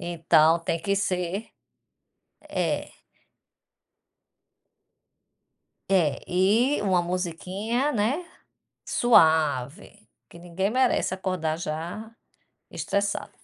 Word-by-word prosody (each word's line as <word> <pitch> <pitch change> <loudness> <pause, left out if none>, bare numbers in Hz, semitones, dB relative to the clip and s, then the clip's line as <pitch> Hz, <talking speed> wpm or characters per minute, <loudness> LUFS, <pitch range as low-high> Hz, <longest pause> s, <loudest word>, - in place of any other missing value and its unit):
Então, 165 -2 +3
tem 165 0 -3
que 200 +4 0
ser 190 +1 -2 1.0
é. - - -2 3.0
É, 165 -8 +2
e 205 +9 +2
uma 190 -3 +2
musiquinha, 185 - -2
né, 255 +11 0 0.6
suave, 160 - +2 0.2
que - - -14
ninguém 175 +3 -3
merece 250 -6 +1
acordar 185 -4 -2
já 170 +7 -5 0.6
estressado. 200 0 -2
185 Hz, 75 wpm, -25 LUFS, 165-205 Hz, 3.0 s, Então